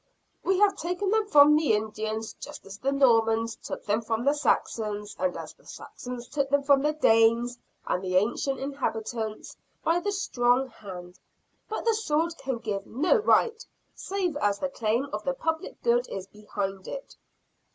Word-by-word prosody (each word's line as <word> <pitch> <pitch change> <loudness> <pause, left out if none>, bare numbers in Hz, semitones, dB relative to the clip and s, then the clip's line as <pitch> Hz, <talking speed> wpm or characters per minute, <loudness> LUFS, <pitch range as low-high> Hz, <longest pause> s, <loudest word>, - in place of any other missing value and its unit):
We 380 0 +2
have 400 0 +4
taken 360 +4 -2
them 435 -1 +2
from 295 -5 +7
the 305 -6 +3
Indians, 220 +1 -2
just - - -9
as 195 +1 -10
the 275 - 0
Normans 230 -4 +3
took - - -7
them 210 +2 +1
from 225 +1 -2
the 285 - +4
Saxons 210 -8 -1
and 185 -1 0
as - - -7
the - - -24
Saxons 245 -1 -8
took 280 0 -1
them 285 0 +2
from 275 -1 +4
the 300 +2 +1
Danes 235 -3 +3 0.3
and 180 - -1
the 185 -1 -2
ancient 240 +7 +1
inhabitants 225 -5 -4 0.3
by 335 +2 +2
the 410 +3 -2
strong 255 -9 +1
hand. 180 -5 -10 0.5
But 440 - -4
the 460 - +4
sword 335 -6 0
can 265 -2 -2
give 210 -4 -4
no 315 - +2
right 450 +1 +3 0.3
save 375 -5 -2
as 205 -7 +1
the 280 - -2
claim 235 0 0
of 210 0 -3
the 270 +3 -1
public 320 +3 -3
good 485 +1 +2
is 190 -1 -5
behind 195 -2 -5
it. - - -7
250 Hz, 170 wpm, -27 LUFS, 215-310 Hz, 0.5 s, from